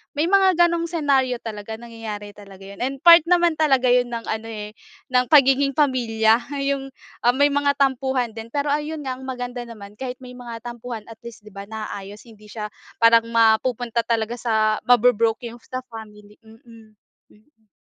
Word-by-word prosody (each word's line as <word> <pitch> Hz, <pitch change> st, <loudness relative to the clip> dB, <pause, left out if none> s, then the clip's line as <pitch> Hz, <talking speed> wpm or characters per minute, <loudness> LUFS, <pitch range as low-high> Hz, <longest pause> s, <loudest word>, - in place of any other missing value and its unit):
May 320 Hz, +6 st, 0 dB
mga 385 Hz, -2 st, +4 dB
gano'ng 340 Hz, -1 st, +1 dB
senaryo 280 Hz, -6 st, +1 dB
talaga, 220 Hz, -1 st, -6 dB
nangyayari 220 Hz, -3 st, -8 dB
talaga 195 Hz, -2 st, -14 dB
'yon, 200 Hz, +1 st, -11 dB
and 270 Hz, +2 st, -4 dB
part 340 Hz, 0 st, +10 dB
naman 345 Hz, -1 st, +4 dB
talaga 265 Hz, -5 st, +3 dB
'yon 245 Hz, 0 st, +3 dB
ng 235 Hz, -1 st, -5 dB
ano, 220 Hz, +1 st, -4 dB
eh, 210 Hz, -1 st, -7 dB, 0.4 s
ng 250 Hz, 0 st, +2 dB
pagiging 275 Hz, -1 st, +4 dB
pamilya 230 Hz, -6 st, +2 dB, 0.2 s
'yong, 275 Hz, -1 st, -2 dB, 0.3 s
ah, 245 Hz, +1 st, +2 dB
may 285 Hz, +1 st, +3 dB
mga 285 Hz, 0 st, +1 dB
tampuhan 265 Hz, -3 st, 0 dB
din. 225 Hz, +1 st, -9 dB
Pero, 285 Hz, +3 st, -2 dB
ayun 300 Hz, +1 st, -3 dB
nga 260 Hz, -2 st, -4 dB
ang 265 Hz, -, -10 dB
maganda 245 Hz, -1 st, -5 dB
naman 210 Hz, -2 st, -12 dB
kahit 255 Hz, -1 st, -5 dB
may 250 Hz, -, -10 dB
mga 235 Hz, -2 st, -9 dB
tampuhan, 240 Hz, -2 st, -7 dB
at 225 Hz, -, -13 dB
least, 230 Hz, -2 st, -12 dB
'di 210 Hz, -, -14 dB
ba, 200 Hz, 0 st, -9 dB
naayos 210 Hz, -2 st, -8 dB
hindi 215 Hz, -3 st, -17 dB
siya 210 Hz, -1 st, -7 dB, 0.2 s
parang 230 Hz, 0 st, +4 dB
mapupunta 230 Hz, +1 st, +1 dB
talaga 230 Hz, +1 st, -1 dB
sa 220 Hz, -2 st, +1 dB
mabo-broke 235 Hz, -1 st, +3 dB
'yong 235 Hz, -, -13 dB
sa 255 Hz, 0 st, -5 dB
family. 210 Hz, -2 st, -12 dB
Mm, 225 Hz, -2 st, -17 dB, 0.3 s
mm. 220 Hz, 0 st, -28 dB
235 Hz, 175 wpm, -22 LUFS, 220-270 Hz, 0.4 s, part